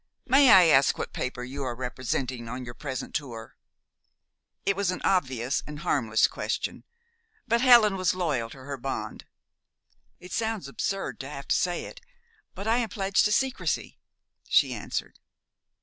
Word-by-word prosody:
"May 270 Hz, +1 st, +6 dB
I 190 Hz, -4 st, +9 dB
ask 140 Hz, -4 st, +4 dB
what -, -, -5 dB
paper 125 Hz, -1 st, -4 dB
you 135 Hz, +3 st, -5 dB
are 125 Hz, -2 st, -3 dB
representing 125 Hz, 0 st, -3 dB
on 125 Hz, +1 st, -5 dB
your 120 Hz, -, -7 dB
present 130 Hz, 0 st, -6 dB
tour?" 115 Hz, -6 st, -5 dB, 1.1 s
It 200 Hz, -, +2 dB
was 200 Hz, -1 st, 0 dB
an 185 Hz, -, -2 dB
obvious 130 Hz, -8 st, +1 dB
and 150 Hz, 0 st, -7 dB
harmless 110 Hz, -6 st, +2 dB
question; -, -, -3 dB, 0.6 s
but 235 Hz, 0 st, +2 dB
Helen 235 Hz, -6 st, +7 dB
was 185 Hz, -1 st, +1 dB
loyal 145 Hz, -11 st, -1 dB
to 130 Hz, +2 st, -12 dB
her 140 Hz, 0 st, -5 dB
bond. 135 Hz, +2 st, -5 dB, 0.9 s
"It 180 Hz, -, -12 dB
sounds 220 Hz, -8 st, -2 dB
absurd 195 Hz, +7 st, -3 dB
to 135 Hz, -, -6 dB
have 140 Hz, -2 st, -8 dB
to -, -, +3 dB
say 175 Hz, -1 st, 0 dB
it, -, -, -11 dB, 0.5 s
but 200 Hz, +3 st, -6 dB
I 225 Hz, +2 st, +3 dB
am 235 Hz, -3 st, -1 dB
pledged 195 Hz, -2 st, +1 dB
to 210 Hz, -, +2 dB
secrecy," 260 Hz, +4 st, -1 dB, 0.5 s
she -, -, +4 dB
answered. -, -, -5 dB
145 Hz, 160 wpm, -27 LUFS, 130-200 Hz, 1.1 s, I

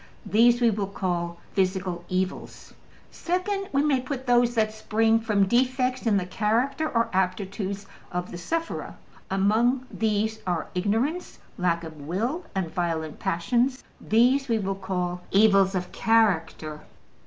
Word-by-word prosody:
These 240 Hz, +3 st, +4 dB
we 235 Hz, -1 st, +5 dB
will 200 Hz, -1 st, -2 dB
call 175 Hz, -3 st, -2 dB, 0.2 s
``physical 185 Hz, -2 st, 0 dB
evils.'' 185 Hz, 0 st, -3 dB, 0.4 s
Second, 385 Hz, +3 st, -2 dB
we 275 Hz, +1 st, +2 dB
may 280 Hz, -4 st, +2 dB
put 260 Hz, 0 st, -5 dB
those 240 Hz, -1 st, +3 dB
that 215 Hz, -1 st, +1 dB
spring 225 Hz, +1 st, +2 dB
from 210 Hz, -3 st, +2 dB
defects 255 Hz, +2 st, +1 dB
in 210 Hz, -3 st, +4 dB
the 185 Hz, -, -1 dB
character 230 Hz, +11 st, 0 dB
or 230 Hz, -1 st, 0 dB
aptitudes 195 Hz, +1 st, -2 dB, 0.3 s
of 180 Hz, 0 st, -3 dB
the 175 Hz, -, -6 dB
sufferer: 330 Hz, -, -3 dB, 0.3 s
among 225 Hz, +7 st, +2 dB
these 220 Hz, 0 st, 0 dB
are 175 Hz, -3 st, -1 dB
ignorance, 225 Hz, -, -1 dB, 0.2 s
lack 170 Hz, -2 st, 0 dB
of 160 Hz, -2 st, -9 dB
will, 225 Hz, -, -2 dB
and 180 Hz, -4 st, -2 dB
violent 165 Hz, -3 st, -2 dB
passions. 245 Hz, +10 st, 0 dB, 0.2 s
These 250 Hz, +5 st, +3 dB
we 230 Hz, -2 st, +2 dB
will 195 Hz, -2 st, -1 dB
call 180 Hz, -2 st, -3 dB
``evils 195 Hz, -2 st, +5 dB
of 180 Hz, -1 st, -3 dB
character.'' 165 Hz, -9 st, +1 dB
210 Hz, 140 wpm, -26 LUFS, 185-245 Hz, 0.4 s, we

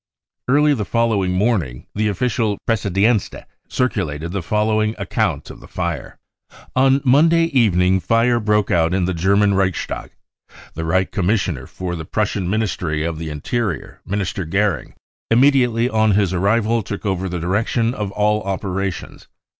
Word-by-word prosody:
Early 145 Hz, +3 st, +4 dB
the 115 Hz, -6 st, -2 dB
following 110 Hz, -3 st, +1 dB
morning 90 Hz, -, 0 dB
the 105 Hz, +1 st, 0 dB
official 105 Hz, 0 st, 0 dB
Preussische 115 Hz, -3 st, 0 dB
Pressedknst 100 Hz, +3 st, +1 dB, 0.3 s
circulated" 85 Hz, -, -2 dB
the 100 Hz, 0 st, -2 dB
following 110 Hz, +3 st, 0 dB
account -, -, -2 dB
of -, -, -12 dB
the -, -, -14 dB
fire: -, -, -4 dB, 0.3 s
46 -, -, -21 dB
On 135 Hz, +1 st, +4 dB
Monday 165 Hz, +6 st, +5 dB
evening 95 Hz, -, +3 dB
fire 115 Hz, +4 st, +2 dB
broke 105 Hz, -2 st, +1 dB
out 85 Hz, +1 st, +2 dB
in 95 Hz, -2 st, +1 dB
the 95 Hz, -, -1 dB
German 100 Hz, +4 st, +2 dB
Reichstag. 95 Hz, -2 st, -1 dB, 0.6 s
The 80 Hz, +1 st, -4 dB
Reich 95 Hz, +3 st, +1 dB
Commissioner 100 Hz, +2 st, -1 dB
for 90 Hz, -1 st, -5 dB
the 80 Hz, -2 st, -6 dB
Prussian 100 Hz, -1 st, -1 dB
Ministry 90 Hz, -7 st, -1 dB
of 80 Hz, -1 st, -3 dB
the 80 Hz, -1 st, -5 dB
Interior, 90 Hz, -, -3 dB
Minister 100 Hz, -1 st, -3 dB
Goering, 95 Hz, -1 st, -1 dB, 0.3 s
immediately 125 Hz, -1 st, +3 dB
on 110 Hz, -3 st, +2 dB
his 100 Hz, -2 st, +2 dB
arrival 110 Hz, +5 st, +1 dB
took 105 Hz, +1 st, -6 dB
over 95 Hz, -1 st, -1 dB
the 90 Hz, 0 st, -3 dB
direction 110 Hz, +7 st, 0 dB
of 105 Hz, -4 st, -3 dB
all 105 Hz, +1 st, +1 dB
operations. 95 Hz, -1 st, -4 dB
105 Hz, 150 wpm, -20 LUFS, 90-115 Hz, 0.6 s, Monday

